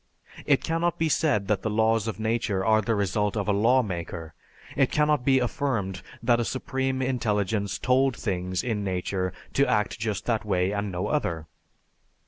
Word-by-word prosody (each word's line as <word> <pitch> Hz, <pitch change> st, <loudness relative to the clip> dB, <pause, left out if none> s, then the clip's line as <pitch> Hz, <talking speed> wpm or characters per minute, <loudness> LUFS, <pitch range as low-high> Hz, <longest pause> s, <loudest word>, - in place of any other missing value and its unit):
It -, -, +3 dB
cannot 165 Hz, +1 st, 0 dB
be 160 Hz, -1 st, +1 dB
said 140 Hz, -, +1 dB
that 105 Hz, -1 st, +1 dB
the 110 Hz, -, -2 dB
laws 110 Hz, 0 st, +2 dB
of 110 Hz, -, -4 dB
nature 110 Hz, -3 st, 0 dB
are 110 Hz, 0 st, +4 dB
the 110 Hz, +2 st, 0 dB
result 100 Hz, +1 st, 0 dB
of 105 Hz, -, -2 dB
a -, -, +3 dB
lawmaker; 95 Hz, -8 st, 0 dB, 0.4 s
it 135 Hz, -2 st, +3 dB
cannot 150 Hz, -3 st, +2 dB
be 135 Hz, 0 st, +4 dB
affirmed 115 Hz, -7 st, -1 dB, 0.2 s
that 120 Hz, -2 st, +3 dB
a -, -, +1 dB
supreme 130 Hz, +1 st, -2 dB
intelligence 105 Hz, -5 st, 0 dB
told 130 Hz, +1 st, +2 dB
things 90 Hz, -3 st, -2 dB
in 110 Hz, -4 st, -1 dB
nature 95 Hz, 0 st, -2 dB, 0.2 s
to 140 Hz, -, +3 dB
act 105 Hz, -1 st, 0 dB
just 105 Hz, -3 st, -2 dB
that 115 Hz, -3 st, 0 dB
way 95 Hz, -2 st, +1 dB
and 100 Hz, -1 st, -2 dB
no 90 Hz, +2 st, -2 dB
other. 85 Hz, -, -1 dB
110 Hz, 170 wpm, -26 LUFS, 100-130 Hz, 0.4 s, are